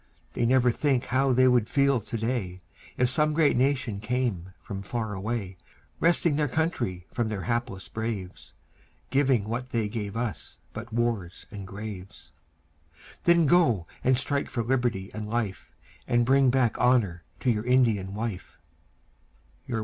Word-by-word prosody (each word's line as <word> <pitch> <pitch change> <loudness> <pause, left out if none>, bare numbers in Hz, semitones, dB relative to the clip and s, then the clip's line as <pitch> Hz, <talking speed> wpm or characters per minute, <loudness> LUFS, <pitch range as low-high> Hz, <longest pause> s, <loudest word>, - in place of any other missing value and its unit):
They 120 - +1
never 125 0 +4
think 135 -1 +1
how 130 +1 +2
they 130 +1 +5
would 120 -3 +3
feel 140 -2 +3
to 115 - -5
day, 110 -6 -3 0.3
If 125 - +3
some 150 +5 +1
great 155 -3 +4
nation 130 -5 +1
came 105 -5 -2
from 100 -1 -6
far 110 +1 -3
away, 100 -1 -4 0.4
Wresting 170 -2 +3
their 150 -1 +2
country 120 - -1
from 120 -2 0
their 100 -4 -3
hapless 115 -6 -2
braves, 110 -5 -5 0.6
Giving 135 -4 +3
what 120 +4 -4
they 115 -4 0
gave 105 0 -4
us 115 -7 -4 0.2
but 115 +2 -7
wars 110 -6 -2
and 100 -2 -7
graves. 100 -1 -8 0.9
Then 170 -1 +5
go 135 - +3 0.2
and 130 0 +4
strike 140 +2 -1
for 120 - -2
liberty 120 -6 0
and 105 0 -5
life, 110 -7 -3 0.4
And 120 -1 +3
bring 135 +1 +4
back 125 -3 +2
honour 110 -9 +2 0.2
to 125 - +3
your 105 -2 -1
Indian 110 -7 +2
wife. 110 -4 -5
120 Hz, 150 wpm, -27 LUFS, 105-130 Hz, 0.9 s, they